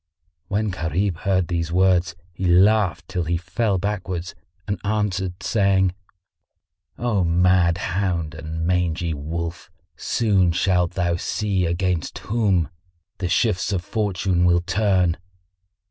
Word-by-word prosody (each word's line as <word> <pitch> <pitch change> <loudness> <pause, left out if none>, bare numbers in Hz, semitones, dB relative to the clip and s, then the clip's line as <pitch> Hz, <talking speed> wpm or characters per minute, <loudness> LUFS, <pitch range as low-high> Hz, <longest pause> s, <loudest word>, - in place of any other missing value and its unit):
When 105 +2 -1
Gharib 90 +1 -1
heard 95 -1 0
these 85 -2 -2
words 90 -1 +2 0.2
he 90 +2 -2
laughed 95 -1 +3
till 90 -3 -2
he 85 +1 0
fell 95 +4 -1
backwards 90 -3 -3 0.3
and 100 - -3
answered, 95 -4 -1
saying, 95 -4 +2 1.0
"O 115 -6 0
mad 85 0 +3
hound 90 -4 -2
and 80 +1 -5
mangy 85 -2 0
wolf, 85 +4 -5 0.3
soon 95 -7 +1
shalt 90 -1 +1
thou 85 -2 0
see 95 -1 -1
against 85 -2 -1
whom 100 - 0 0.5
the 90 -2 -2
shifts 100 0 +1
of 90 -3 -1
Fortune 95 -4 0
will 85 -1 +4
turn!" 95 -2 +1
90 Hz, 120 wpm, -22 LUFS, 85-100 Hz, 1.0 s, will